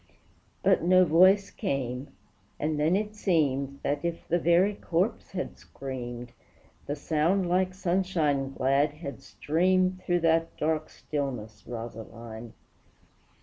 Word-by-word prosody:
But - - +4
no 185 +2 +5
voice 185 +5 +5
came, 135 - -3 0.5
and 150 0 -1
then 155 +4 +3
it 210 +1 -2
seemed 140 -8 0
That, 145 +2 -1
if 170 -1 -3
the 175 - +2
very 175 +5 +4
corpse 185 +3 -1
had 185 - -4
screamed, 125 -2 -7 0.6
The 145 - -1
sound 165 +5 +1
like 185 +1 +1
sunshine 170 -7 0
glad 135 +2 +2
had 150 -2 -8
streamed 185 +3 +1
Through 175 -1 0
that 165 0 +2
dark 155 0 0
stillness, 125 -8 -5
Rosaline! 115 -1 -8
155 Hz, 120 wpm, -28 LUFS, 135-185 Hz, 0.6 s, no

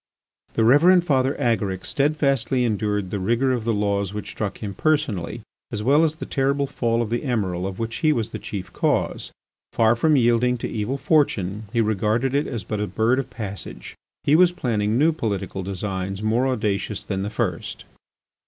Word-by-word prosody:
The 115 - +2
Reverend 170 +9 +6
Father 135 -3 +2
Agaric 105 -7 0
steadfastly 135 -4 +1
endured 105 -3 -1
the 100 - -2
rigour 120 +7 +1
of 120 -3 -1
the 115 - +1
laws 100 -1 -1
which 105 - -5
struck 105 -3 -4
himself 100 -3 -6
personally, 145 - 0 0.3
as 105 - -3
well 145 +6 +4
as 160 -1 +1
the - - -6
terrible 140 0 0
fall 120 -3 0
of 110 - -6
the 120 - +1
Emiral 95 -9 -1
of 95 -1 -6
which 115 0 -3
he 155 - +3
was 115 -6 -1
the - - -5
chief 95 -3 -6
cause. - - 0 0.4
Far 115 0 +4
from 155 +6 +3
yielding 125 0 +3
to - - -4
evil 115 +5 -2
fortune, 110 - +1
he 115 -1 +2
regarded 110 +4 +1
it 145 +1 +1
as 115 -5 -4
but 105 - -4
a 105 - -1
bird 110 +7 +1
of 135 - -4
passage. 100 -4 -7 0.3
He 145 - +4
was 180 +1 +6
planning 110 -9 0
new 155 +5 +4
political 100 - -3
designs 95 +1 -4
more 115 +4 +2
audacious 105 -4 -1
than 95 -2 -3
the 100 - -2
first. 100 -7 -3
115 Hz, 185 wpm, -23 LUFS, 100-135 Hz, 0.4 s, Reverend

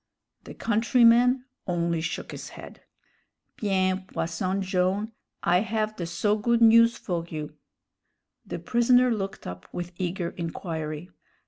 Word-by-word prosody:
The - - -9
countryman 240 +3 +4 0.2
only 170 -2 0
shook - - -4
his - - -7
head. - - -12 0.8
"Bien, 190 -2 0
Posson 185 +4 -2
Jone', 190 +3 0 0.3
I 175 +1 +4
have 215 +1 -1
the 170 -4 -4
so 205 +5 +1
good 235 +2 +2
news 230 +1 +6
for 175 -3 -3
you." 155 -1 -6 0.9
The - - -5
prisoner 245 +1 +3
looked 195 -3 -5
up 90 0 -8
with 175 0 -5
eager 180 -1 -2
inquiry. 165 -1 -5
190 Hz, 125 wpm, -26 LUFS, 170-230 Hz, 0.9 s, news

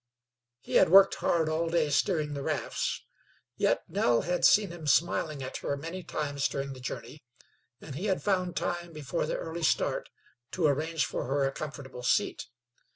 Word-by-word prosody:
He - - +1
had - - +5
worked 195 +2 +8
hard 165 -2 +2
all 160 +1 0
day 165 -3 +1
steering 150 0 +1
the 140 - -4
rafts, - - -2 0.5
yet - - +1
Nell 120 -1 +2
had 180 +2 -2
seen 205 -3 +5
him 170 -3 -8
smiling 150 +1 +1
at 130 - -5
her 140 - -3
many 165 +6 -6
times 145 -4 -2
during 140 0 -4
the 130 - -11
journey, 135 +3 -7 0.6
and 145 - -9
he 165 +9 -4
had 190 -2 0
found 185 -3 0
time 175 -1 -3
before 150 +2 -3
the - - -1
early 165 +1 -5
start 160 - +1 0.4
to 180 - 0
arrange 155 +2 +1
for - - -3
her 135 +1 +1
a 135 - 0
comfortable 135 -4 -7
seat. 125 - 0
155 Hz, 175 wpm, -29 LUFS, 140-170 Hz, 0.6 s, worked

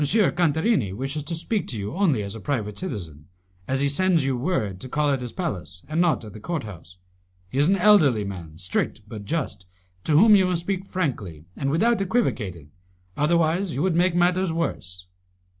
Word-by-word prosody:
Cantarini 170 - +2
wishes 135 +7 -3
to 165 - -2
speak 200 +6 -1
to 115 - -4
you 100 0 -4
only 160 - +2
as 100 0 -5
a 110 - -7
private 105 -4 -2
citizen, 85 - -6 0.4
as 135 +1 0
he 140 - +3
sends 165 +1 +2
you 135 -1 +1
word 120 - -2
to 130 - -8
call 150 +1 +1
at 135 -2 0
his 120 -2 -5
palace 95 - -5
and 155 +3 0
not 170 -9 +1
at 105 - -10
the 110 - -9
court 165 +6 -3
house. 90 -4 -11 0.5
He 135 - -1
is 145 - +4
an 195 - +4
elderly 175 - +5
man, 85 -6 -7
strict 90 +4 -2
but 105 -1 -8
just, 135 - -3 0.4
to 155 - +2
whom 215 +4 +8
you 190 -2 +4
must 175 -2 0
speak 190 +2 -3
frankly 105 - -3
and 135 - -2
without 220 +9 +2
equivocating, 105 - -1 0.4
otherwise 165 +3 +1
you 140 - 0
would 185 -3 +1
make 175 0 +3
matters 180 +1 +2
worse." 90 - -4
145 Hz, 190 wpm, -24 LUFS, -, 0.5 s, whom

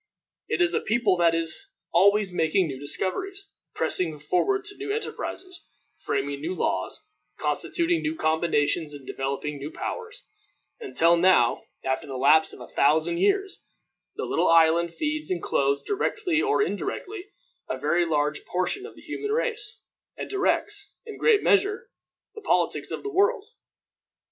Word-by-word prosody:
It 355 - +2
is 345 0 +2
a - - +2
people 220 -4 +2
that 170 -1 +3
is 165 - 0 0.3
always 200 +2 +4
making 175 +3 +2
new 135 -4 -5
discoveries, 195 - -3 0.2
pressing 165 -4 +1
forward 380 - 0
to 405 -1 -9
new 405 0 -4
enterprises, 370 -5 -5 0.4
framing 140 0 -2
new 170 +5 -3
laws, - - -2 0.3
constituting 340 -1 0
new 315 0 -2
combinations 160 - 0
and 140 -2 -12
developing 140 +2 -3
new 140 +2 -5
powers; 470 +1 -6 0.5
until 170 - +3
now 170 -9 +3 0.2
after 130 +1 -2
the 135 -2 -5
lapse 155 +5 +5
of - - -11
a - - -9
thousand 160 +4 +2
years, 390 - +1 0.5
the - - -3
little - - +1
island 165 +1 +4
feeds 305 - -3
and 180 -2 -2
clothes, 140 0 +1
directly 390 -5 0
or 425 0 +2
indirectly, 410 -2 -4 0.4
a 130 - -2
very 155 +6 +1
large 150 -2 0
portion 185 - -2
of - - -14
the - - -15
human 420 - -5
race, 450 -1 -2 0.4
and - - -6
directs, 400 0 -1
in 440 - -7
a - - -11
great 440 -3 +4
measure, 415 +3 +2 0.4
the 440 - -10
politics - - 0
of - - -5
the 410 0 -5
world. 405 +3 +2
185 Hz, 155 wpm, -26 LUFS, -, 0.5 s, lapse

